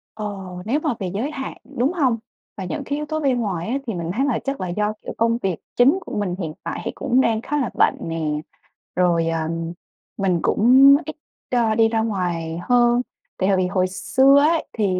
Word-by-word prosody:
Ồ, 195 -4 -6
nếu 270 +8 +1
mà 305 -5 -1
về 190 - -2
giới 245 +10 -2
hạn, 270 -3 -6 0.2
đúng 265 +9 +2
hông? 260 -9 +2 0.4
Và 195 - -4
những 280 +10 -4
cái 285 - -2
yếu 300 - -3
tố 310 +1 -2
bên 270 -5 +1
ngoài 185 -6 -2
á, 260 - 0
thì 225 - -2
mình 170 -1 -3
thấy 265 +7 +1
là 275 -5 0
chắc 275 -6 -3
là 185 - -2
do, 210 +4 -1
kiểu, - - -6
công 230 +1 +2
việc 190 -7 -2 0.2
chính 265 +8 +5
của - - -5
mình 185 -4 -1
hiện 160 -4 -4
tại - - -4
thì - - -1
cũng 255 +2 +2
đang 225 -3 +1
khá 295 +5 -2
là 265 -7 0
bận - - +3
nè, 165 0 -3 0.7
rồi, 170 -2 +2
ờ, 165 0 0 0.8
mình 185 -3 +1
cũng 265 +5 +6
ít, 310 - -6 0.4
ơ, 230 -3 +2
đi 225 0 +5
ra 225 0 +1
ngoài 175 -6 -2
hơn 240 +2 +3 0.4
tại 190 +1 +1
hồi 195 - +3
vì 185 -1 +1
hồi 185 0 +1
xưa 265 +8 +4
ấy, 315 +3 +2
thì 215 -3 0
225 Hz, 220 wpm, -22 LUFS, 185-265 Hz, 0.8 s, cũng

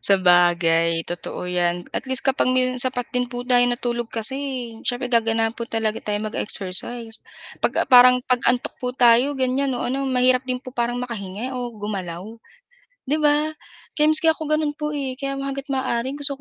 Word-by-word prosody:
sabagay 175 -3 +4 0.2
totoo 175 +1 -5
'yan. 175 0 -1
At - - -3
least 260 0 0
kapag 265 -1 +1
may 255 0 +1
sapat 250 -1 -2
din 250 - +2
po 245 +1 -6
tayo 245 -1 +5
na 245 0 -1
tulog 240 -1 -3
kasi 225 +4 -2 0.5
siyempre 250 0 -2
gaganahan 225 -1 +1
po 235 - -4
talaga 225 -1 -1
tayo 210 0 -2
mag-exercise, 215 +2 -5 0.5
pag - - +3
ah, - - 0
parang 250 0 +8
pag-antok 245 0 +1
po 250 -1 -3
tayo, 245 +2 +4
ganyan, 265 +1 0
o, 245 -1 -2
ano, 275 +2 -1
mahirap 255 0 +2
din 250 -1 -3
po 260 - -10
makahinga 240 -1 -3
o 245 -1 -4
gumalaw, 195 -5 -5 0.9
'di 305 +3 0
ba? 300 +1 +2 0.4
Kaya 300 0 +3
maski 315 +1 +2
ako 315 - -9
gano'n 305 -1 +1
po, 300 0 -3
eh, 275 -3 -3
kaya 275 +1 -4
hangga't 275 +1 -5
maaari 260 0 -1
gusto 285 -1 -1
245 Hz, 170 wpm, -22 LUFS, 225-265 Hz, 0.9 s, parang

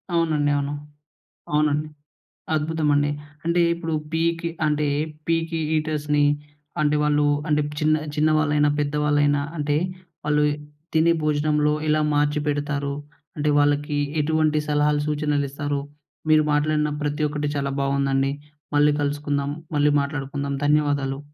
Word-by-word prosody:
అవునండి. 155 -3 +2
అవును. 140 0 -2 0.8
అవునండి. 150 0 +2 0.7
అద్భుతమండి! 150 -2 +1 0.4
అంటే, 170 +1 +2
ఇప్పుడు 165 -1 -4 0.2
పీకి 165 +1 0 0.2
అంటే 150 0 +1 0.4
పీకి 165 0 0 0.2
ఈటర్స్‌ని 150 -1 0 0.6
అంటే, 150 0 +2
వాళ్ళు 150 0 +2 0.2
అంటే, 150 0 +2 0.2
చిన్న 155 0 +3 0.2
చిన్నవాళ్ళైనా, 150 -1 +3
పెద్దవాళ్ళైనా 145 0 +2
అంటే, 145 -1 0 0.5
వాళ్ళు 150 0 +2
ఇ - - -1 0.4
తినే 160 +1 +4
భోజనంలో 150 0 +2 0.2
ఎలా 155 0 +3
మార్చిపెడతారు, 145 -1 0 0.4
అంటే 150 0 +1
వాళ్ళకి 145 0 +1 0.2
ఎటువంటి 155 0 +2
సలహాలు, 150 0 +2
సూచనలిస్తారు, 145 -1 -1 0.5
మీరు 155 0 +5
మాట్లాడిన 150 0 +1
ప్రతి 145 +1 -1
ఒక్కటీ 150 0 -2
చాలా 140 -1 -1
బావుందండి. 135 0 +1 0.4
మళ్ళీ 145 0 +5
కలుసుకుందాము. 145 0 -1 0.2
మళ్ళీ 145 0 +3
మాట్లాడుకుందాం. 140 0 -3
ధన్యవాదాలు. 145 -2 +1
150 Hz, 110 wpm, -23 LUFS, 145-155 Hz, 0.8 s, మీరు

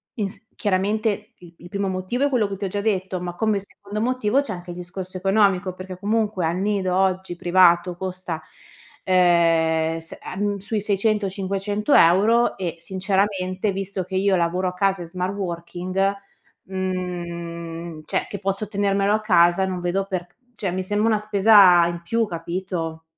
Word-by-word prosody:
ins 205 0 -5
chiaramente, 210 +2 -1
il 175 -1 -14
il 175 - -13
primo 200 0 -2
motivo 185 +8 -2
è - - +2
quello 240 -6 +2
che 200 - -5
ti 200 - -4
ho - - 0
già 205 +2 -2
detto, 190 -3 -1
ma 175 -1 -4
come 215 +1 +1
secondo 200 +1 -8
motivo 255 +1 +1
c'è 285 - -5
anche 175 0 -9
il - - -7
discorso 185 +1 -7
economico 195 -1 +2
perché, 185 0 -8
comunque, 210 -3 0
al 165 +2 0
nido 195 -2 0
oggi 190 -1 0
privato 175 0 +4
costa, 185 -3 -4 0.6
ehm, 165 -3 +3
s 165 0 -10
ehm, 205 +1 -2
sui 210 +2 -2
600-500€ 205 - +2
e, 175 -3 -3
sinceramente, 190 +1 -1
visto 195 0 -3
che 185 +2 -7
io 195 +1 +3
lavoro 180 +1 0
a - - -8
casa 195 0 +1
in 170 - -6
smart 180 +2 -3
working, 185 +1 -2 0.5
mhmm, 170 -3 -5
cioè - - -1
che 200 - -5
posso 195 +2 -2
tenermelo 200 0 +1
a 215 - +1
casa, 175 -2 +4
non 185 -1 -3
vedo 180 +2 0
per 185 -3 -3 0.3
cioè 200 -5 -2
mi 185 +1 -2
sembra 205 +3 +1
una 220 -1 +3
spesa 200 -4 +6
in 170 0 -4
più, 230 +6 +1
capito? 170 -2 -4
190 Hz, 165 wpm, -23 LUFS, 175-205 Hz, 0.6 s, spesa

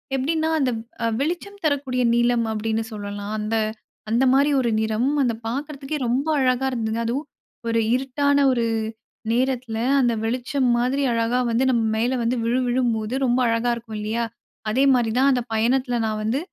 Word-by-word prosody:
எப்படின்னா 315 +4 0
அந்த 260 -3 +1
வ் 225 - -6 0.2
அ 230 - +2
வெளிச்சம் 355 +7 -3
தரக்கூடிய 270 -4 0
நீலம 240 -1 +2
அப்படின்னு 220 +1 -1
சொல்லலாம். 205 0 -5
அந்த 215 +1 -2 0.5
அந்த 235 +4 +2
மாரி 280 +2 +4
ஒரு 235 - 0
நிறம் 220 +5 0
அதை 235 -3 0
பார்க்கறதுக்கே 280 +3 -4
ரொம்ப 260 +5 0
அழகா 255 0 +2
இருந்ததுங்க. 225 -1 -2
அதுவும் 260 +6 -2 0.4
ஒரு 230 - +2 0.2
இருட்டான 285 +2 +1 0.2
ஒரு 235 -2 0 0.7
நேரத்தில 250 -2 -1 0.2
அந்த 240 -2 +2
வெளிச்சம் 250 +3 0
மாதிரி 255 +4 +1
அழகா 230 +2 +1
வந்து 230 +3 +2
நம்ம 230 -2 +2
மேல 245 +3 +1
வந்து 240 +2 +1
விழு 245 +2 +1
விழும்போது, 240 -3 0
ரொம்ப 245 0 +2
அழகா 230 +1 +1
இருக்கும் 225 -2 -8
இல்லியா? 220 +3 -1 0.5
அதே 265 +5 +2
மாரி 230 -3 +1
தான் 275 - +5
அந்த 250 - +1
பயணத்தில 245 +2 +1
நான் 215 -1 -2
வந்து, 230 +6 0
245 Hz, 165 wpm, -23 LUFS, 225-265 Hz, 0.7 s, தான்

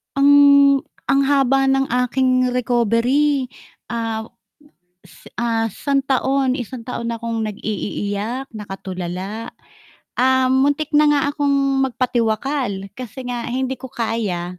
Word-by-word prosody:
Ang, 280 0 +6 0.3
ang 275 - +4
haba 270 -1 +3
ng 270 -1 +1 0.2
aking 255 0 +2
recovery. 250 +3 +1 0.4
Ah 225 -1 -2 0.8
is 170 - -19
ah, 230 -1 0
isang 275 +6 -1
taon, 265 0 +1
isang 245 -1 -6
taon 235 -2 -4
akong 230 -1 -3
nag-iiiyak, 215 +3 -4
nakatulala. 195 +1 -6 0.7
Um, 260 +1 +3
muntik 290 +1 -1
na 300 0 +5
nga 295 -1 +3
akong 280 -2 +1
magpatiwakal, 235 -4 -1
kasi 255 +1 -7
nga 240 -1 -4
hindi 260 +1 -2
ko 260 - -8
kaya. 205 -7 -3
255 Hz, 110 wpm, -20 LUFS, 225-275 Hz, 0.8 s, Ang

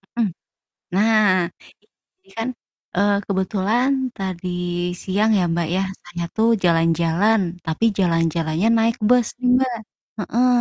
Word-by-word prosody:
Mhm. 225 -5 0 0.6
Nah, 205 -4 +3 0.7
ini 385 - -34
kan, 225 +1 -2 0.5
eee, 200 +2 +3
kebetulan 200 +6 0 0.3
tadi 185 -2 -4 0.6
siang 205 +3 +1
ya 185 - +2
Mbak, 170 -1 -1
ya, 190 - +1 0.2
saya 175 -1 -6
tuh 225 +1 +3 0.2
jalan-jalan, 170 +5 +2 0.3
tapi 160 +7 -1
jalan-jalannya 165 0 +1
naik 225 +1 +1
bus 245 -1 +4
nih, 250 -1 +1
Mbak. 255 -2 0 0.4
Heeh. 235 +5 +1
195 Hz, 120 wpm, -21 LUFS, 170-225 Hz, 0.7 s, bus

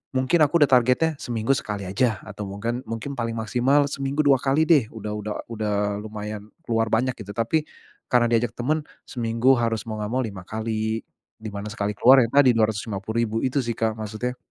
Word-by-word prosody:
mungkin 130 +7 +2
aku 150 +1 +4
udah 145 - +3
targetnya 125 +7 +2
seminggu 115 0 -1
sekali 105 -7 -2
aja, 110 +5 0
atau 105 -1 -7
mungkin 115 +5 -3
mungkin 120 +4 -5
paling 115 -1 -2
maksimal 125 +6 +2
seminggu 140 +2 -1
2 140 -2 +4
kali 140 +4 +2
deh, 150 -9 +4
udah 105 -1 -5
udah 105 0 -4 0.2
udah 110 -2 -2 0.3
lumayan 105 -1 -6 0.2
keluar 115 -4 0
banyak, 125 +3 +2
gitu. 100 -1 -7
Tapi, 115 +7 0 0.4
karena 120 -1 +3
diajak 115 0 +1
teman 150 +6 -1 0.3
seminggu, 120 +2 +2
harus, 115 -2 0
mau 110 - -4
nggak 105 +1 -3
mau 130 - +1
5 100 -5 -6
kali, 110 0 -2 0.4
di 110 0 -6
mana 100 0 -6
sekali 105 -1 -2
keluar, 130 +2 +7
ya, - - 0
tadi 140 -3 +5
Rp250.000 110 0 -1
itu 130 +2 0
sih, 120 -3 -1
Kak. 110 -1 -1
Maksudnya, 110 +4 -4
115 Hz, 185 wpm, -24 LUFS, 110-130 Hz, 0.4 s, keluar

